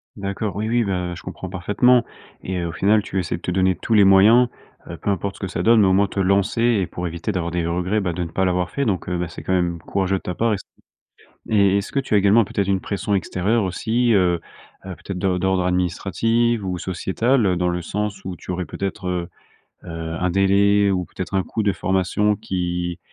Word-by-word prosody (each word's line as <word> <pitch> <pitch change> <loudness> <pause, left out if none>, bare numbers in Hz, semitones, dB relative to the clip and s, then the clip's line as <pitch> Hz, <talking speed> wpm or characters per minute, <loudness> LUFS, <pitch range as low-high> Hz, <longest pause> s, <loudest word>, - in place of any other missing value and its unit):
D'accord 100 -1 -4
oui, 110 +2 -2
oui, 120 +1 +2
bah 90 -3 -2
heu, - - -6
je - - -10
comprends 95 0 -7
parfaitement 105 +7 +3 0.4
et 95 0 -3
heu, 85 - -2
au - - -4
final 105 +5 +2
tu 95 - -3
essaies 85 -2 -2
de - - -16
te 90 - -3
donner 95 0 +2
tous 115 - -3
les 105 -2 +6
moyens, 105 +6 +6 0.4
heu, - - -6
peu 100 - -1
importe 100 +1 -3
ce - - -14
que 95 - -3
ça 90 -1 -3
donne 110 0 +5
au 95 - +3
moins 100 +1 +3
te 100 - -5
lancer 100 +4 +1
et 110 -7 +2
pour 90 - -6
éviter 85 +5 -4
d'avoir 85 -3 -2
des 85 -1 -1
regrets, 90 +5 0
bah, 90 -3 -2
de 90 +1 -3
ne 80 - -5
pas 95 - 0
l'avoir 90 -1 0
fait 140 - -1
donc 95 -5 -1
heu, 90 - -1
bah, 90 -1 -2
c'est 85 - -10
quand 95 - -1
même 85 -2 0
courageux 95 +2 -1
de - - -8
ta 90 - -3
part 115 +2 +1
et - - -1
c - - -11 0.9
et 100 -2 +3
est-ce 100 - -4
que 140 - +1
tu 130 - -8
as - - +6
également 100 +3 +4
peut-être 100 0 -2
une 95 -1 +1
pression 100 +1 -2
extérieure 100 +3 0
aussi, 115 +6 0
heu 90 -4 +2 0.4
heu, 95 - -6
peut-être 95 +2 -6
de 90 -1 0
d'ordre 95 0 +1
administrative 100 +5 0
ou 90 -1 -2
sociétal, 105 +7 0
heu, 90 -1 +1
dans 90 0 0
le 90 - -2
sens 105 +4 -4
où 90 - -4
tu - - -9
aurais 90 0 -3
peut-être, 95 -1 -4
heu 90 -1 -2 0.6
heu, - - -9 0.3
un 90 - 0
délai 100 +2 +3
ou 90 -2 -1
peut-être 95 +3 -6
un 95 - +2
coût 110 - -3
de 100 - +2
formation 95 +3 0
qui 90 -2 -3
95 Hz, 240 wpm, -21 LUFS, 90-105 Hz, 0.9 s, les